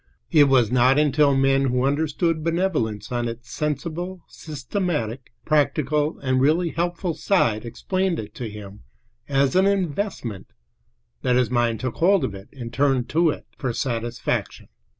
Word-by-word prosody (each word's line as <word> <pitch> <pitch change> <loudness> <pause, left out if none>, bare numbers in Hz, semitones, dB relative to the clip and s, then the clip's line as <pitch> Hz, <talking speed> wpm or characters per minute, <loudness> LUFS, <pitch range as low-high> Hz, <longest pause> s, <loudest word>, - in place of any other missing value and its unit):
It 150 -3 +7
was 130 -5 +3
not 130 +2 +4
until 145 -1 +3
men 135 0 +3
who 125 0 +1
understood 155 +3 0
benevolence 155 - -1
on 120 -1 -1
its 120 0 -8
sensible, 165 +4 -3
systematic, 145 - -4
practical, 150 0 +1
and 130 -1 +1
really 165 +5 +3
helpful 175 +1 -2
side 120 - +1
explained 185 - -1
it 105 -1 -7
to 120 -3 -5
him 105 -1 -10 0.5
as 140 +2 +2
an 190 +1 +5
investment 180 - -2 0.7
that 125 -1 +2
his 125 -1 +2
mind 120 -2 +1
took 130 -3 -3
hold 190 +2 +4
of 100 - -2
it 95 +1 -11
and 120 -3 -8
turned 135 -2 +1
to 165 +1 +3
it - - -4
for 130 -3 -1
satisfaction. 120 -1 -3
135 Hz, 150 wpm, -23 LUFS, 120-165 Hz, 0.7 s, It